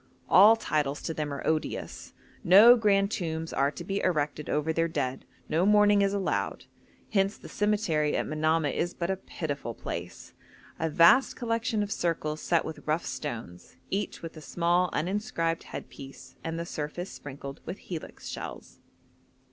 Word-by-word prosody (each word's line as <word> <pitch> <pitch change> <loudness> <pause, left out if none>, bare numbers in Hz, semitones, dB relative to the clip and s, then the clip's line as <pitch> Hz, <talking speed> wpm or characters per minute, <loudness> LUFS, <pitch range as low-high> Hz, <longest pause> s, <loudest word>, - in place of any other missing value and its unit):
All 210 +4 +8
titles 150 -9 -1
to 165 - -2
them 150 -2 -3
are 140 - -5
odious; 155 -1 -3 0.3
no 210 +7 +9
grand 200 -3 +2
tombs 165 -4 -3
are 140 +1 +2
to 170 - -8
be 195 +3 -2
erected 150 -3 -1
over 150 +2 0
their 165 +1 +1
dead, 130 -5 -3 0.2
no 165 +3 +1
mourning 205 0 +5
is 200 0 +2
allowed; 200 -2 -2 0.5
hence 195 -1 +1
the - - -12
cemetery 205 -8 +1
at - - -1
Manamah 155 -1 +1
is 175 +5 -2
but 170 +2 -2
a - - 0
pitiful 145 -10 -5
place 85 +1 -7 0.5
a 160 - 0
vast 170 - +5
collection 230 -2 -1
of 205 - -5
circles 155 -4 -1
set 170 -2 +1
with 160 - -8
rough 155 +3 0
stones, 110 - -6 0.2
each 195 -2 -3
with 165 0 -7
a 155 - -10
small 175 +3 +1
uninscribed 180 -3 -1
headpiece, 135 0 -10
and 165 0 -3
the 170 - -3
surface 170 +4 -5
sprinkled 140 0 -9
with 185 - -4
helix 170 -4 -8
shells. - - -8
165 Hz, 160 wpm, -28 LUFS, 150-195 Hz, 0.5 s, no